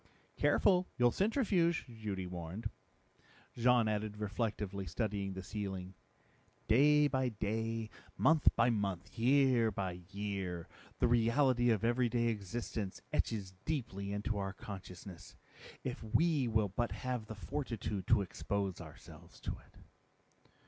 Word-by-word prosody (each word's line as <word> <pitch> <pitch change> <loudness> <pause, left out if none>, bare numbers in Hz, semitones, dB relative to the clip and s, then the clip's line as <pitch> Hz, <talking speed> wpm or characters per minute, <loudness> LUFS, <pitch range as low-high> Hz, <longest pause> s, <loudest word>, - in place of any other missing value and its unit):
"Careful, 180 -2 +4
you'll 120 0 +5
centrifuge," 195 - +2
Judy 110 -6 -5
warned. 90 +5 -5 0.8
Jean 120 -1 +4
added 105 0 -1
reflectively, 105 -2 -2
studying 100 +1 -2
the 95 0 -6
ceiling, 95 -2 -4 0.7
"Day 145 +5 +6
by 130 -2 +1
day, 110 +1 -2 0.3
month 160 -1 +4
by 120 +1 +4
month, 100 -1 -2
year 125 -2 +4
by 95 -3 -3
year, 100 -4 -3 0.3
the 125 - +3
reality 120 +1 +3
of 110 -3 +2
everyday 120 -1 +2
existence 105 -1 -4
etches 100 -4 -1
deeply 110 -10 -3
into 105 +1 -1
our 95 0 -2
consciousness, 95 -3 -9 0.5
if - - -4
we 140 +4 +2
will 110 -3 +2
but 115 +3 -1
have 125 0 -3
the 110 - -6
fortitude 110 -5 -3
to 110 -4 +5
expose 100 0 -3
ourselves - - -13
to - - -2
it." - - -11
110 Hz, 120 wpm, -35 LUFS, 100-120 Hz, 0.8 s, Day